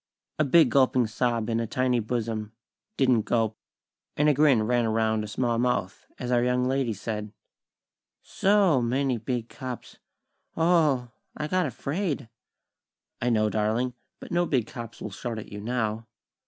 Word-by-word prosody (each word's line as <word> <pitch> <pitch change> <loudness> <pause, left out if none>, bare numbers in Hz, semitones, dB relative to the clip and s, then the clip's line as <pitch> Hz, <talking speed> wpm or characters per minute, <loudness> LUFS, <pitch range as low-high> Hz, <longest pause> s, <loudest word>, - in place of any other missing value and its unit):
A - - +5
big 150 -2 +5
gulping 130 -2 +4
sob 115 0 -1
in 115 -1 0
a 115 - -2
tiny 125 +1 +1
bosom 110 -1 -3 0.4
didn't 130 -4 +4
gulp; 110 0 0 0.6
and 150 - +3
a 150 - +5
grin 140 -6 +4
ran 120 +2 +2
around 110 -1 +1
a - - -5
small 115 +2 0
mouth, 120 -6 -1
as 125 0 -4
our 120 -1 +3
young 125 0 +1
lady 130 -2 0
said: 105 0 -4 0.9
"So 195 -9 +3
many 125 +1 0
big 115 +1 -3
cops! 130 -2 -8 0.6
O 160 - +1
o - - +4 0.3
o! 125 -2 -6 0.3
I 150 - -2
got 185 0 +1
afraid!" 140 - -3 0.9
"I 125 - +1
know, 110 -2 +3
darling; 110 +4 0 0.3
but - - -10
no 175 0 +2
big 125 -6 +1
cops 115 0 -9
will 105 - -5
shout 115 +4 -5
at 110 - -8
you 105 0 -6
now. 110 -1 -2
120 Hz, 165 wpm, -26 LUFS, 110-130 Hz, 0.9 s, A